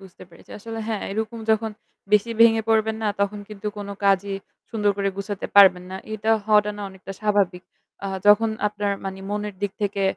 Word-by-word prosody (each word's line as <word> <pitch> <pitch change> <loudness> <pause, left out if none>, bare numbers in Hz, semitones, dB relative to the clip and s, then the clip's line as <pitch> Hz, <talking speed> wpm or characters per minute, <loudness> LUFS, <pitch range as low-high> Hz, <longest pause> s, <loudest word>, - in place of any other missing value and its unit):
বুঝতে 190 -2 -14
পেরেছি। 170 - -18
আসলে 225 +2 -7
হ্যাঁ 220 -3 -2
এরকম 220 +2 -3
যখন 220 0 +2 0.4
বেশি 210 +2 +4
ভেঙে 225 -1 +6
পড়বেন 220 0 +2
না, 215 - +1
তখন 200 +1 0
কিন্তু 210 -1 -8
কোন 200 -1 -6 0.2
কাজই 195 0 +2 0.3
সুন্দর 210 -3 +1
করে 200 -1 0
গুছাতে 200 0 -4
পারবেন 185 -3 +7
না। 190 - -5 0.2
এটা 215 +1 -1 0.2
হওয়াটা 210 -1 +4
না 205 - -6
অনেকটা 190 0 -9
স্বাভাবিক। 200 -4 +1 0.4
অ্যাঁ 195 -1 -3
যখন 215 +2 +6 0.2
আপনার 205 -1 -2
মানি 190 0 -5
মনের 210 0 -3
দিক 200 -1 -1
থেকে 200 -1 -1
205 Hz, 185 wpm, -23 LUFS, 195-220 Hz, 0.4 s, পারবেন